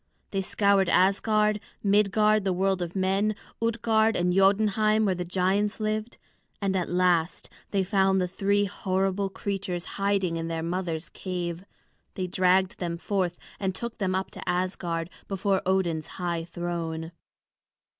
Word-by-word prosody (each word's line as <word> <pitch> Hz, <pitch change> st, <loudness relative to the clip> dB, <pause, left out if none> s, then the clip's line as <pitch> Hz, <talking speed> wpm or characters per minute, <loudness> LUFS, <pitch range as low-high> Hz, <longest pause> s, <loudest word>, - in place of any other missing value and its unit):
They 195 Hz, -, 0 dB
scoured 195 Hz, -1 st, +2 dB
Asgard, 210 Hz, +2 st, +3 dB, 0.2 s
Midgard 210 Hz, +1 st, +3 dB
the 190 Hz, -1 st, +1 dB
world 190 Hz, 0 st, +1 dB
of 175 Hz, +1 st, -4 dB
men, 195 Hz, +3 st, +1 dB, 0.3 s
Utgard 225 Hz, -1 st, +2 dB
and 180 Hz, 0 st, +1 dB
Jotunheim 215 Hz, +2 st, +3 dB
where 195 Hz, -, +2 dB
the 180 Hz, 0 st, -3 dB
giants 190 Hz, +4 st, 0 dB
lived. 215 Hz, +1 st, -2 dB, 0.4 s
And 195 Hz, -2 st, 0 dB
at 180 Hz, -2 st, -1 dB
last 175 Hz, -2 st, +1 dB, 0.2 s
they 195 Hz, -2 st, +1 dB
found 190 Hz, 0 st, +2 dB
the 180 Hz, -, +1 dB
three 200 Hz, +2 st, +1 dB
horrible 195 Hz, 0 st, -1 dB
creatures 190 Hz, -3 st, -3 dB, 0.2 s
hiding 195 Hz, -4 st, +1 dB
in 165 Hz, 0 st, -3 dB
their 165 Hz, -1 st, -3 dB
mother's 170 Hz, -2 st, -2 dB
cave. 175 Hz, -1 st, -4 dB, 0.5 s
They 185 Hz, -, -2 dB
dragged 185 Hz, +1 st, +2 dB
them 170 Hz, -2 st, -2 dB
forth 180 Hz, -1 st, -1 dB, 0.2 s
and 190 Hz, -2 st, -1 dB
took 235 Hz, 0 st, -5 dB
them 185 Hz, -2 st, 0 dB
up 190 Hz, 0 st, -2 dB
to -, -, -7 dB
Asgard, 180 Hz, -2 st, -2 dB, 0.2 s
before 195 Hz, 0 st, 0 dB
Odin's 170 Hz, -4 st, +1 dB
high 170 Hz, -2 st, -2 dB
throne. 165 Hz, -1 st, -4 dB
190 Hz, 145 wpm, -27 LUFS, 175-200 Hz, 0.5 s, Asgard